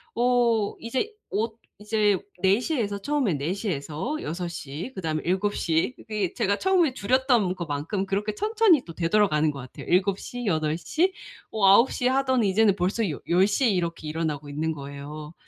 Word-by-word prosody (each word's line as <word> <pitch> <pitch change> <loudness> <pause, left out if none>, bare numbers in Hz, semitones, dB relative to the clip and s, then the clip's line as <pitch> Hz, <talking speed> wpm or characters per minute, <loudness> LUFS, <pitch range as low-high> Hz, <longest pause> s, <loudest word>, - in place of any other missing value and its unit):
어 235 -3 +2
이제 260 - -2 0.2
엇 220 +2 -2 0.2
이제 210 -1 +2 0.2
4 195 +3 +4
시에서 235 -8 -1
처음에 260 - 0
4 145 +5 -2
시에서 190 - -3
6 175 +3 -3
시. 165 - -6
그다음에 160 -4 -2
7 190 +3 0
시. 165 +8 0
이게 210 -5 -3
제가 200 +1 0
처음에 365 -7 +2
줄였던 245 -4 +2
것만큼 170 +4 -3
그렇게 205 +2 -1
천천히 430 - +3
또 165 - -9
되돌아가는 165 -4 +2
것 140 - -9
같아요. 130 -1 -10
7 190 +2 +2
시, 245 0 -6
8 155 -4 +1
시, 345 - 0 0.4
어 215 -3 +1
9 215 +6 +6
시하더니 255 -3 +1
이제는 205 0 +4
벌써 195 +4 0
여 145 - -6
열 180 +3 +5
시에 260 +5 +2
이렇게 170 -5 -2
일어나고 150 -2 -3
있는 155 +3 -2
거예요. 145 +2 -8
200 Hz, 300 characters per minute, -25 LUFS, 160-235 Hz, 0.4 s, 9